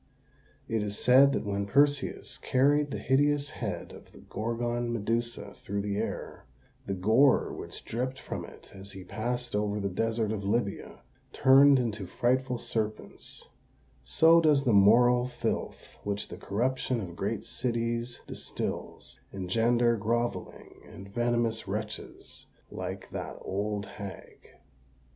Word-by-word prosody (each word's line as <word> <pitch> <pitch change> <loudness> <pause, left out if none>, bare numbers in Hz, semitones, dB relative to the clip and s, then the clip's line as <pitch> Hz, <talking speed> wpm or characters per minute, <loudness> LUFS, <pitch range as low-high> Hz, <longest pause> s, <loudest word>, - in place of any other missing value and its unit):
It 115 -1 0
is 105 0 -3
said 135 +3 +6
that - - -2
when 100 0 -2
Perseus 140 +3 +1
carried 145 +3 +2
the - - -4
hideous 145 +2 +1
head 100 - -5
of - - -14
the - - -16
Gorgon 120 +2 -3
Medusa 115 -1 -2
through 100 0 -4
the 100 -1 -2
air, - - -4 0.4
the 100 - -1
gore 110 +9 +4
which - - -8
dripped 130 +3 -3
from - - -5
it - - -13
as 100 +1 -10
he 95 - -9
passed 120 +5 -3
over 105 0 0
the 100 -1 -1
desert 115 +2 0
of 105 -2 -3
Libya 100 0 -2 0.3
turned 135 +1 +7
into 105 -6 -2
frightful 125 +5 0
serpents: 110 -2 -5 0.6
so 160 - +5
does 150 -4 +4
the 120 -5 +2
moral 120 +5 +5
filth 125 - -3 0.2
which 100 0 -3
the - - -8
corruption 125 +4 -1
of 90 -5 -6
great - - -3
cities 120 0 -2
distils, - - -6
engender 115 +5 +2
grovelling 120 +3 -3
and 100 +3 -11
venomous 120 -1 0
wretches 105 +2 -6 0.2
like - - -5
that - - -5
old 100 +1 -2
hag. 100 -2 -10
115 Hz, 135 wpm, -29 LUFS, 100-125 Hz, 0.6 s, turned